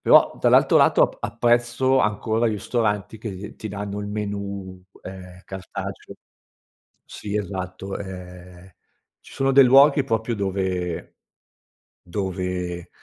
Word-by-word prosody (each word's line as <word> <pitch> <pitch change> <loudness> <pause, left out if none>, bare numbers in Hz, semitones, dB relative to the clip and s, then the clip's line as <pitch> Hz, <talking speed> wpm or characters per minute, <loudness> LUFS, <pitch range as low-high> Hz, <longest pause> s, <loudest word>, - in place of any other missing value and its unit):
però - - +5
dall'altro - - +5
lato - - +5
ap - - +1
apprezzo 120 +3 +2
ancora 110 +2 +1
ristoranti 105 -1 -1
che 105 -2 -7
ti 110 - -6
danno 100 0 -5
il 105 - -5
menù, 100 -3 -5 0.2
ehm, 90 -1 -10
cartaceo 95 -1 -7 0.9
Sì, 105 0 -5
esatto, 95 -1 -5
ehm, 90 -1 -10 0.5
ci - - -15
sono 135 0 +1
dei 135 +1 +8
luoghi 140 +3 +6
proprio 115 -2 -1
dove 95 -3 -3 0.9
dove 90 -2 -4
100 Hz, 110 wpm, -23 LUFS, 95-110 Hz, 0.9 s, dei